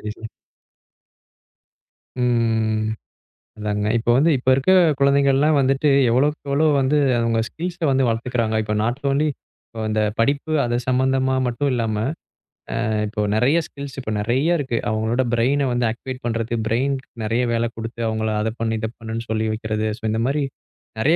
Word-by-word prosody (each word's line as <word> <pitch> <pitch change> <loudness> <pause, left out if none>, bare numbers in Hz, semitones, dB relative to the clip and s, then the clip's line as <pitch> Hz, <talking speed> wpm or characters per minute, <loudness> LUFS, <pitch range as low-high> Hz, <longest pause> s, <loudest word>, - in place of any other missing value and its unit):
சரி. 115 - -10 2.0
ம். 110 -3 +1 0.7
அதாங்க. 105 0 -2
இப்ப 115 +1 -2
வந்து 150 +6 +4
இப்ப 130 +1 -1
இருக்கிற 135 +8 +3 0.3
குழந்தைகள் 140 0 +4
எல்லாம் 150 +2 +3
வந்துட்டு, 135 +2 +2 0.2
எவ்வளவோ 140 +5 +3
எவ்வளவு 150 +2 +2
வந்து 135 +3 +2 0.2
அவங்க 115 -1 +1
ஸ்கில்ஸ் 175 +2 -5
வந்து 135 0 +2
வளர்த்துக்கிறாங்க. 115 -1 -1
இப்ப 105 0 -2
நாட் 120 +4 -1
ஒன்லி 150 +2 +2 0.6
அந்தப் 105 -1 0
படிப்பு 140 +6 +1
அதைச் 120 0 -1
சம்பந்தமா 130 +1 +2
மட்டும் 125 +4 -1
இல்லாம, 115 -3 -1 0.9
ஆ, - - -1 0.2
இப்ப 105 0 -2
நிறைய 130 +8 +3
ஸ்கில்ஸ். 140 -2 -9
இப்ப 110 -4 -4
நிறைய 130 +11 +1
இருக்கு. 130 -4 -2
அவங்களோட 110 +4 0
brain 130 +5 +2
வந்து 120 -1 +1
ஆக்டிவேட் 130 +3 -6
பண்றது. 115 0 -2
பிரைன் 130 +5 +1 0.3
நிறைய 115 +3 0
வேலை 115 0 +1
கொடுத்து 115 +1 -7
அவங்களை 110 0 -1
அதைச் 110 +2 -3
செஞ்சு 115 0 0
இதைச் 110 +1 -4
செஞ்சுன்னு 115 +1 -5
சொல்லி 110 0 0
வைக்கிறது. 110 -1 -2 0.3
இந்த 110 +1 0
மாதிரி 145 +2 0 0.6
நிறைய 155 +8 +3
120 Hz, 150 wpm, -21 LUFS, 110-135 Hz, 2.0 s, வந்து